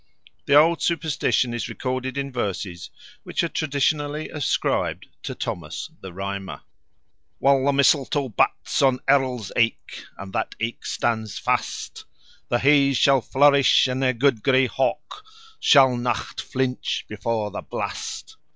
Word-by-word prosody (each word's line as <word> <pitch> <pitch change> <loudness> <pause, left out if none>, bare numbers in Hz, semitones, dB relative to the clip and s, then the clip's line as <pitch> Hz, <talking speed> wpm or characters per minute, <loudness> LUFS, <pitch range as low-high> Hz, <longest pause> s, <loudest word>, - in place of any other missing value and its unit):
The 140 - +4
old 165 +3 +5
superstition 150 -7 0
is 120 - -4
recorded 130 +1 -4
in 140 0 -3
verses 100 -7 -4 0.3
which - - -2
are - - +1
traditionally 150 0 -1
ascribed 150 -3 -1 0.2
to - - -6
Thomas - - -5
the 95 - -8
Rhymer: 95 +1 -6 0.7
While 135 -1 +3
the 140 - +3
mistletoe 140 0 +2
bats 110 - 0
on 130 -2 +3
Errol's 130 -6 +1
aik, 115 -1 -1
And 95 -1 -9
that - - -2
aik 115 +1 -4
stands 110 -3 -2
fast, - - -3 0.4
The 120 - +2
Hays 140 0 +4
shall 135 -2 +4
flourish, 140 +1 +4
and 130 +1 -2
their 130 -1 +2
good 125 -2 +1
grey 130 +1 +3
hawk 150 - -2 0.4
Shall 135 -3 +5
nocht 120 -1 -3
flinch 130 -1 -2
before 105 0 -3
the - - -5
blast. - - -6
130 Hz, 135 wpm, -23 LUFS, 115-140 Hz, 0.7 s, old